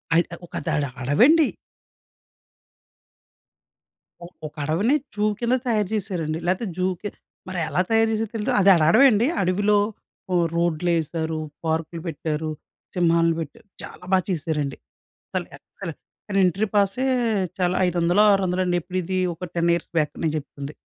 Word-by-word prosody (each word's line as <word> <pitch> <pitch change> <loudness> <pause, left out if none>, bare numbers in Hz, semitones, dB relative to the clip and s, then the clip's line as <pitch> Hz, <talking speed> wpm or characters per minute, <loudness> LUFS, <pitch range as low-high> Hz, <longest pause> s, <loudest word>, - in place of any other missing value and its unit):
అద్ 170 - +5 0.5
దడ 150 - +1 0.2
అడవండి. 255 - +5 3.0
ఒక 150 - -15
అడవిని 185 - +2 0.2
జూ 210 - -1 0.2
కింద 240 +1 +1
తయారు 210 -5 +1
చేశారండి. 175 -7 -2
లేతే 185 +6 0
జూకి 185 +2 -1 0.4
మరి 185 -2 -3
ఎలా 180 - +1
తయారు 225 0 +3
చేసారో 220 -1 -2
తెలీదు. 210 - -1
అది 195 - +5
అడ 170 - +1
అడవండి. 235 +2 +5
అడవిలో 200 +3 +2 0.6
ఓహ్! 175 -1 +3
రోడ్లేశారు, 165 -1 0 0.2
పార్కులు 165 +1 -2
పెట్టారు, 155 0 -3 0.5
సింహాన్ని 165 -2 +3
పెట్టారు. 165 +7 -8
చాలా - - -10
బాగా 185 -2 +3
చేశారండి. 150 -5 -2 0.5
అసలు - - -2
ఎక్స్‌లెంట్. - - -9 0.3
కానీ 195 -1 0
ఎంట్రీ 195 +5 +1
పాసే 200 +5 +2 0.5
చాలా 180 0 +1
ఐదొందలో, 175 +4 +3
ఆరొందలో 185 -1 +1
అండి. 175 -1 +1
ఎప్పుడు 185 +3 -3
ఇది 185 +2 -1 0.2
ఒక 180 0 -7
10 170 0 +2
ఇయర్స్ 170 - -6
బ్యాక్ 150 - -1
నేను 155 -1 +1
చెప్తుంది. 140 0 -7
180 Hz, 130 wpm, -23 LUFS, 160-205 Hz, 3.0 s, అద్